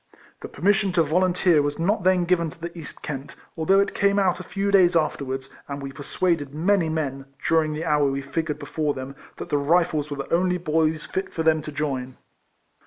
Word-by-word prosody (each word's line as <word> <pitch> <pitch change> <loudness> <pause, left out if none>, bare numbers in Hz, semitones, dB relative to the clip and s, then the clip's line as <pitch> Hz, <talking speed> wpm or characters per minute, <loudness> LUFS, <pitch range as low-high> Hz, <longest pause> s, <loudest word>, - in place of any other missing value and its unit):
The - - -7
permission 200 +1 +1
to 170 - +4
volunteer 175 0 +3
was 145 0 -2
not 190 +7 +1
then 185 -1 +3
given 170 -2 +1
to 165 - -13
the 170 +1 -6
East 160 -4 -10
Kent, 140 -1 -6 0.2
although 190 +4 +3
it 200 - +1
came 200 0 +2
out 185 -3 +2
a - - -6
few 200 +3 -2
days 180 -3 +5
afterwards, 135 -4 -1 0.2
and 140 0 -5
we 135 -1 -6
persuaded 145 +1 -1
many 175 +1 +2
men, 140 -4 -3 0.2
during 160 -2 +2
the 155 +2 -4
hour 150 -3 +3
we 135 0 -3
figured 150 +1 -2
before 150 0 -2
them, 130 +1 -7 0.2
that - - -8
the 145 - +1
Rifles 155 0 +1
were 145 - -5
the 140 - -5
only 180 +1 +2
boys 160 -2 0
fit 190 - -4
for 160 - -2
them 160 -1 +3
to 150 - -7
join. 135 -4 -3
160 Hz, 205 wpm, -24 LUFS, 145-180 Hz, 0.2 s, days